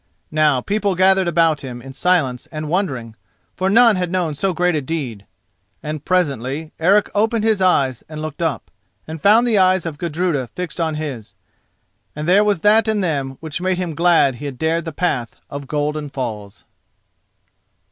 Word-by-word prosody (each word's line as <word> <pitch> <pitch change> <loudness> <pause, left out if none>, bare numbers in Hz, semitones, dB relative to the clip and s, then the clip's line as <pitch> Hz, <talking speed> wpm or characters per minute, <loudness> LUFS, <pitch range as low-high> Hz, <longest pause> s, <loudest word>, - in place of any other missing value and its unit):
Now 150 -4 +3
people 200 +3 -1
gathered 190 0 +3
about 165 -3 +2
him 125 -3 -7
in 135 +2 -10
silence 145 -6 0
and 155 -1 -5
wondering, 135 - -2 0.4
for 190 +1 -1
none 230 0 +5
had 180 -1 -2
known 180 -4 0
so 190 +7 -1
great 180 +1 +1
a 155 - 0
deed. 130 -9 -5 0.6
And 150 -1 -5
presently 150 -4 -1
Eric 195 +5 +3
opened 220 +1 +1
his 220 -3 +2
eyes 135 -9 +2
and 155 -1 -7
looked 155 0 -6
up, 160 -4 -2 0.4
and 160 -1 -7
found 220 +4 +5
the 225 -4 +2
eyes 185 -1 +3
of 155 -3 -5
Gudruda 165 -5 -1
fixed 180 +4 -6
on 160 -2 -1
his, 140 -8 -6 0.8
and 150 +1 -4
there 195 +4 +5
was 205 -5 +1
that 215 +2 +4
in 215 -2 +1
them 140 -7 -2
which 160 +1 -5
made 185 0 0
him 180 -3 -3
glad 165 -6 +3
he 145 - -8
had 140 -3 -5
dared 165 +2 0
the 165 - -4
path 145 -8 -2 0.2
of 140 -1 -6
Golden 150 0 -2
Falls. 110 -7 -6
160 Hz, 180 wpm, -19 LUFS, 140-185 Hz, 0.8 s, none